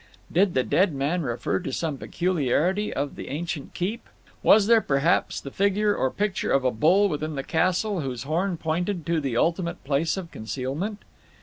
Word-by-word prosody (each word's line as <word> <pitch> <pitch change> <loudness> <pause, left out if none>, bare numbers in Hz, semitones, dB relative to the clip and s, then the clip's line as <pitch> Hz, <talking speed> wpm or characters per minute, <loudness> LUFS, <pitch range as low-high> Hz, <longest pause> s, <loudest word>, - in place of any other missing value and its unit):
Did 185 +2 +2
the 130 - +3
dead 165 +3 +2
man 145 +6 0
refer 120 -8 -1
to - - -5
some 150 0 -2
peculiarity 180 +4 0
of 145 0 -3
the - - -7
ancient 155 0 -5
keep? 205 +7 -3 0.3
Was 210 -2 +6
there, 230 +1 +5
perhaps, 140 +2 +1
the 140 - -8
figure 200 +3 +2
or 130 - +1
picture 205 +5 -1
of 135 - +3
a 130 - +3
bull 175 - +4
within 155 -2 -3
the 135 - -3
castle 185 +4 +1
whose 125 -4 -4
horn 170 +5 -1
pointed 170 +2 -2
to 165 0 0
the 130 -5 -2
ultimate 170 +3 0
place 150 +6 0
of 175 -3 -6
concealment? 140 - -4
165 Hz, 180 wpm, -25 LUFS, 140-190 Hz, 0.3 s, Was